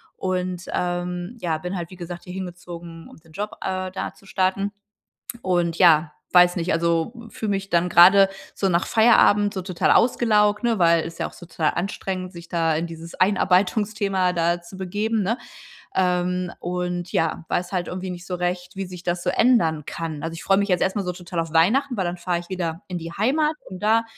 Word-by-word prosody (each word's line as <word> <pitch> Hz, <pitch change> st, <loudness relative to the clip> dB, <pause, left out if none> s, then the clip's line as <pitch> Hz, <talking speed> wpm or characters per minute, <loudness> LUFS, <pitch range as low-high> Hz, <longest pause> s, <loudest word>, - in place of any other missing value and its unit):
und, 185 Hz, -1 st, -2 dB
ähm, 180 Hz, +4 st, -3 dB
ja, 165 Hz, -5 st, -1 dB
bin 180 Hz, +4 st, -4 dB
halt 170 Hz, 0 st, -6 dB
wie -, -, -9 dB
gesagt 175 Hz, -1 st, -8 dB
hier 180 Hz, -, -9 dB
hingezogen, 175 Hz, -2 st, -8 dB
um -, -, -15 dB
den 160 Hz, 0 st, -21 dB
Job, 210 Hz, +6 st, -4 dB
äh, 185 Hz, 0 st, -2 dB
da -, -, -4 dB
zu -, -, -21 dB
starten. 190 Hz, +1 st, 0 dB, 0.7 s
Und 175 Hz, -2 st, +1 dB
ja, 160 Hz, -4 st, +5 dB, 0.2 s
weiß 180 Hz, 0 st, +6 dB
nicht, 175 Hz, +1 st, 0 dB
also 170 Hz, +5 st, +1 dB, 0.2 s
fühle 220 Hz, -, -4 dB
mich 195 Hz, 0 st, -2 dB
dann 175 Hz, +1 st, +2 dB
grade 190 Hz, +3 st, +7 dB, 0.3 s
so 195 Hz, -, 0 dB
nach 175 Hz, -1 st, +1 dB
Feierabend 210 Hz, -2 st, +4 dB
so 190 Hz, -, -3 dB
total 180 Hz, -2 st, +1 dB
ausgelaugt, 210 Hz, -3 st, +3 dB
ne, 230 Hz, -2 st, +2 dB
weil 170 Hz, -2 st, +4 dB
ist 165 Hz, -, -8 dB
ja -, -, -1 dB
auch -, -, -17 dB
so 175 Hz, -, -12 dB
total 160 Hz, -2 st, 0 dB
anstrengend, 185 Hz, 0 st, -3 dB
sich 170 Hz, -2 st, -11 dB
da 165 Hz, -2 st, +1 dB
in 165 Hz, +2 st, -1 dB
dieses 165 Hz, 0 st, -9 dB
Einarbeitungsthema 195 Hz, 0 st, +2 dB
da 170 Hz, 0 st, +1 dB
zu 175 Hz, +2 st, -12 dB
begeben, 205 Hz, +4 st, -1 dB
ne? 225 Hz, +6 st, 0 dB, 0.6 s
Ähm, 180 Hz, -1 st, +1 dB
und 180 Hz, 0 st, -3 dB
ja, 165 Hz, 0 st, 0 dB
weiß 175 Hz, +1 st, -1 dB
halt 180 Hz, -2 st, -1 dB
irgendwie 185 Hz, +1 st, -5 dB
nicht 175 Hz, 0 st, -7 dB
so 185 Hz, -, -3 dB
recht, 180 Hz, +1 st, -3 dB
wie 195 Hz, 0 st, -3 dB
sich 180 Hz, -1 st, -9 dB
das 175 Hz, -1 st, -2 dB
so -, -, +2 dB
ändern 165 Hz, -, +3 dB
kann. 160 Hz, -2 st, -5 dB
Also, 165 Hz, 0 st, -4 dB
ich 165 Hz, -, -8 dB
freue 195 Hz, 0 st, +4 dB
mich 200 Hz, +1 st, 0 dB
jetzt 180 Hz, -, +2 dB
erst 190 Hz, -, 0 dB
mal 200 Hz, -, -1 dB
so 180 Hz, -, -2 dB
total 175 Hz, -1 st, -4 dB
auf 165 Hz, -1 st, -5 dB
Weihnachten, 240 Hz, +11 st, +3 dB
weil 190 Hz, -, 0 dB
dann 175 Hz, +1 st, -3 dB
fahre 175 Hz, 0 st, -1 dB
ich 175 Hz, -, -13 dB
wieder 175 Hz, -2 st, -3 dB
in 180 Hz, -1 st, -3 dB
die 165 Hz, 0 st, -7 dB
Heimat, 300 Hz, -, +1 dB
um 185 Hz, -, -8 dB
da 225 Hz, +2 st, +3 dB
180 Hz, 210 wpm, -23 LUFS, 170-195 Hz, 0.7 s, grade